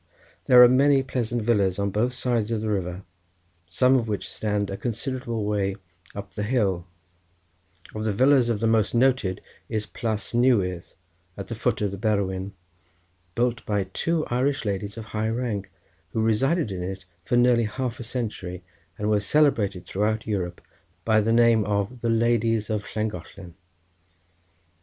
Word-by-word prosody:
There 125 -1 +9
are - - +10
many 135 +2 +4
pleasant 120 -3 -2
villas 100 -5 +2
on 100 0 -1
both 120 +5 0
sides 120 -3 -1
of 115 -2 -1
the 110 -1 -1
river, 90 -1 -3 0.7
some 125 +9 +3
of 120 -3 +1
which 105 -2 -3
stand 105 -2 -1
a - - -3
considerable 120 0 -3
way 100 -2 0 0.4
up 100 -2 -7
the 105 - -4
hill; 105 -6 0 1.1
of 110 0 -4
the 110 - +1
villas 130 +4 +4
the 115 -1 0
most 110 0 +2
noted 120 -6 +2 0.3
is 110 -2 -2
Plas 110 -3 -4
Newydd 105 -8 +1 0.4
at - - -7
the - - -3
foot - - -1
of 100 - 0
the 100 - -7
Berwyn, 100 -2 -1 0.8
built 120 -1 0
by 105 -2 +1
two 165 -2 0
Irish 135 +1 0
ladies 100 +1 -3
of 110 - -6
high 110 0 -2
rank, 110 -4 -3 0.4
who 110 - 0
resided 130 - +1
in 90 -2 -4
it 95 +1 -5 0.2
for 120 +6 +1
nearly 120 -1 +4
half 125 +2 -4
a - - -5
century, 105 -7 -4 0.3
and 105 - -2
were 105 -1 +3
celebrated 105 - +2
throughout 105 +2 -1
Europe 90 -5 -3 0.4
by 110 -1 +4
the 110 +2 0
name 115 -1 +5
of 105 +4 -2
the 115 - 0
Ladies 115 -1 +1
of 105 -1 -1
Llangollen. 95 -4 -5
110 Hz, 160 wpm, -25 LUFS, 100-120 Hz, 1.1 s, are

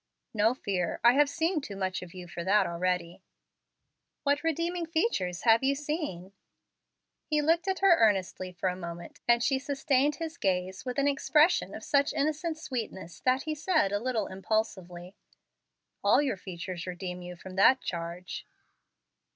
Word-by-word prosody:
"No 220 +3 +3
fear. 185 -8 -2
I 240 +1 +7
have 290 +1 +4
seen 325 +2 0
too 205 -7 -7
much 185 -1 -2
of 180 -2 -9
you 180 -1 -8
for 170 0 -6
that 200 +2 +4
already." 180 +1 -2 1.0
"What 285 +1 +1
redeeming 335 +2 -1
features 320 - -1
have 225 -1 +5
you 275 +1 +2
seen?" 285 - -4 0.9
He 305 -1 +1
looked 330 +4 +2
at 380 -1 -1
her 380 -4 +6
earnestly 190 -4 +1
for 180 +1 -3
a 180 - -3
moment, 170 -1 -8
and 235 0 +4
she 270 -1 +2
sustained 280 +1 +1
his 330 0 -6
gaze 185 -1 -1
with 250 0 -4
an 280 0 +2
expression 300 +4 +3
of - - -8
such 280 0 +2
innocent 310 +2 -1
sweetness 225 - -6
that 255 +1 +1
he 310 - -2
said, 310 - +1
a 205 - 0
little 230 -3 -1
impulsively, 190 -3 -3 0.9
"All - - +5
your 280 -6 +1
features 180 -1 -7
redeem 180 0 -5
you 180 0 -8
from 185 +1 -10
that 260 +7 +6
charge." 170 +1 -5
225 Hz, 160 wpm, -29 LUFS, 185-295 Hz, 1.0 s, I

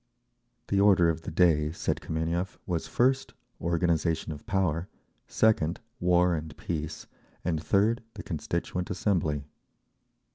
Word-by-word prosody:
The 100 - +2
order 95 -4 +5
of 80 0 -5
the 100 - -6
day, 80 -3 +3
said - - -2
Kameniev, 85 +4 -2
was 85 -3 -2
first, 130 +2 +1 0.3
Organisation 85 -1 +1
of 75 -1 -9
Power; 90 -3 0 0.4
second, 90 -7 +2 0.2
War 90 0 +4
and 80 -1 -4
Peace; 80 -2 -4 0.4
and 80 -3 0
third, 105 +5 +2
the - - -7
Constituent 85 +2 -3
Assembly. 85 -7 0
85 Hz, 120 wpm, -28 LUFS, 80-95 Hz, 0.4 s, order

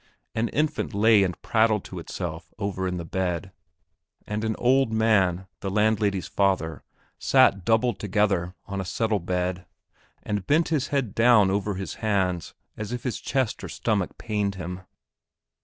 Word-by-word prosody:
An 115 +1 0
infant 150 -7 -1
lay 110 0 +5
and 90 -3 -1
prattled 110 -2 +2
to 90 - -7
itself 85 -1 -6
over 95 -2 -2
in 90 0 -2
the 85 - -5
bed, 90 0 -2 0.7
and 105 +1 -3
an 110 -1 0
old 130 -1 +3
man, 100 -5 +2
the 95 - -3
landlady's 105 -2 +1
father, 95 -6 0 0.4
sat 100 -1 +4
doubled 115 +4 +2
together 95 -3 0
on 100 -1 -4
a - - -3
settle 105 +3 0
bed, 90 +1 -2 0.6
and 105 -3 -3
bent 160 +3 +3
his 150 -4 0
head 135 -8 -1
down 115 -4 +5
over 100 0 -1
his 95 0 -5
hands 95 -5 0 0.2
as 110 +1 -5
if 125 -1 -4
his 125 - -3
chest 130 -5 -1
or - - -5
stomach 105 -5 -1
pained 105 -3 -1
him. 90 0 -6
100 Hz, 155 wpm, -25 LUFS, 95-110 Hz, 0.7 s, lay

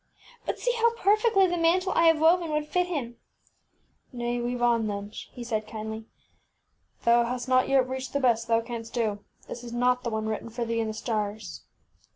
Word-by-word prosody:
But - - -1
see - - 0
how 465 0 +3
perfectly 425 -2 +4
the 350 -1 -1
mantle 365 +3 +2
I 335 - +4
have 325 -1 +5
woven 335 +1 +4
would 300 0 -1
fit 360 +3 +1
him! 260 -9 -4 1.0
ŌĆÖ - - -6
ŌĆśNay, 240 0 -1
weave 245 0 -2
on, 230 -2 +3
then, 205 0 -4
ŌĆÖ - - -9
he 245 - -7
said, 220 -3 -2
kindly. 220 0 -6 1.0
ŌĆśThou 235 0 +5
hast 250 +1 -3
not 255 0 +3
yet 265 -2 +4
reached 260 -1 -5
the 280 - +1
best 235 -3 +2
thou 230 0 +3
canst 230 0 -7
do. 215 -4 0 0.3
This 240 - -7
is 235 -1 -8
not 250 +1 +2
the 235 - -1
one 220 -1 -2
written 220 +1 -3
for 235 +1 -3
thee 230 0 -1
in 225 - 0
the 215 - -4
stars. 215 -1 -4
240 Hz, 205 wpm, -27 LUFS, 225-300 Hz, 1.0 s, have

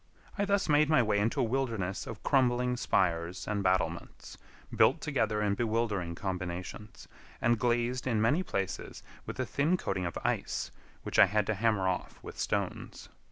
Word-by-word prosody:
I 205 - 0
thus 200 0 +1
made 150 -1 +4
my 155 -5 +5
way 105 -2 +1
into 110 +3 0
a - - +3
wilderness 115 -6 -2
of 110 -2 -8
crumbling 125 -2 +2
spires 85 -6 0
and 105 -1 -1
battlements, 90 -3 -1 0.4
built - - +4
together 110 -7 0
in 100 -1 +2
bewildering 110 -6 -1
combinations, 90 +2 -5 0.3
and 120 -1 +2
glazed 120 +2 0
in 115 -4 +1
many 115 +11 +3
places 95 - -4 0.2
with - - -6
a - - 0
thin 155 +6 +1
coating 95 - -2
of 85 - -5
ice, - - -1 0.3
which - - -1
I - - +9
had 105 +2 +1
to 110 - 0
hammer 105 -2 +1
off 90 -1 -2
with - - -9
stones. - - -3
110 Hz, 165 wpm, -30 LUFS, 95-125 Hz, 0.4 s, I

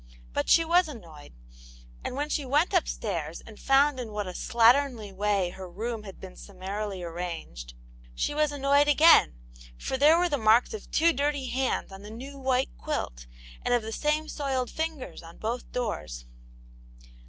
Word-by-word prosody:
But - - -1
she 330 - +6
was 350 +2 +4
annoyed, 170 - -11 0.7
and - - -4
when 290 +2 -1
she 300 -1 -1
went 295 +8 +1
upstairs 175 - -1
and 220 -2 -14
found 275 0 +3
in 235 -3 -5
what 210 -1 -3
a 185 - -5
slatternly 235 -1 +2
way 200 -2 0
her 185 0 -9
room 220 +5 -4
had 195 - -10
been 185 -1 -10
summarily 195 0 -6
arranged, 165 - -6 0.4
she - - -1
was 300 0 +1
annoyed 285 +1 +3
again, 295 - +6 0.4
for 265 - -3
there 300 +4 +6
were 355 +1 +2
the 285 - 0
marks 220 - +4
of 440 - -8
two 335 +1 +3
dirty 285 -1 -1
hands 260 -5 -1
on 195 0 -10
the 205 - -10
new 270 +5 -9
white 260 0 0
quilt, - - -4 0.4
and 245 - +2
of 240 - 0
the 220 - -5
same 300 +5 0
soiled 265 -5 -2
fingers 320 -4 -4
on 165 0 -13
both 235 +3 -4
doors. 135 - -4
245 Hz, 170 wpm, -27 LUFS, 195-285 Hz, 0.7 s, she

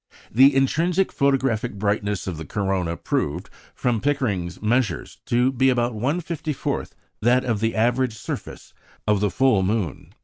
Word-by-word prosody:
The 135 +4 +6
intrinsic 170 +8 +2
photographic 135 -4 +1
brightness 100 -1 -1
of 90 -4 -4
the 80 - -6
corona 95 -1 -1
proved, 80 +6 -2 0.2
from 120 -4 0
Pickering's 110 -12 -1
measures, 115 +2 -1
to 125 +2 +3
be 135 +1 +3
about 120 -1 +1
1/54 155 +5 -2 0.3
that 125 +3 +3
of 115 -4 0
the 115 +1 0
average 120 +1 +1
surface 115 - -7 0.3
of 105 -1 +3
the 105 0 +1
full 115 +1 +3
moon. 95 -6 -2
120 Hz, 140 wpm, -23 LUFS, 100-135 Hz, 0.3 s, The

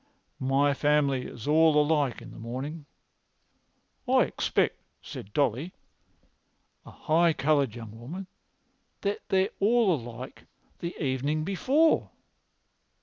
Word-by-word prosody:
My 135 +2 +2
family 140 -2 +1
is 115 +3 -9
all 155 0 +5
alike 150 -4 +1
in - - -11
the - - -11
mornin'."[Pg 135 +7 -6 1.2
245] - - +4
"I - - +5
expect," - - 0 0.2
said 100 - -9
Dolly, 140 - 0 1.1
a - - -13
high 165 +1 +2
coloured 140 -5 +1
young 115 -2 -9
woman, 170 +11 -7 0.8
"that 200 0 -1
they're 190 -1 +3
all 220 -1 +4
alike 120 -2 -7 0.3
the 170 +1 -5
evening 145 +2 -1
before." 265 - +2
150 Hz, 115 wpm, -28 LUFS, 130-170 Hz, 1.2 s, all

